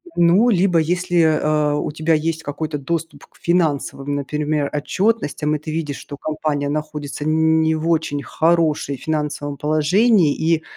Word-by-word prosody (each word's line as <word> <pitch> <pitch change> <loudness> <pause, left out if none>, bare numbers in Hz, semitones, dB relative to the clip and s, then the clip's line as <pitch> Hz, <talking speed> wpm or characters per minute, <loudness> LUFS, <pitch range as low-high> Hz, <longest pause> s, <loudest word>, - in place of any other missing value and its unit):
Ну, 180 +8 +4
либо 180 -4 +3
если, 175 +2 +1 0.2
а, 150 -1 +1
у 150 - -2
тебя 155 +2 0
есть 160 +1 -1
какой-то 150 +1 -4
доступ 165 +3 -4
к - - -26
финансовым, 145 -4 0
например, 150 +1 -1
отчетностям, 155 -2 0
и - - -3
ты 155 +1 -6
видишь, 155 -3 -3
что 145 - -9
компания 150 -1 -2
находится 150 -1 -4
не 160 0 +2
в 160 +1 -3
очень 155 -3 0
хорошей 160 -4 +1
финансовом 150 -1 -3
положении 155 - +3
и, 160 0 +1
155 Hz, 145 wpm, -20 LUFS, 145-165 Hz, 0.2 s, Ну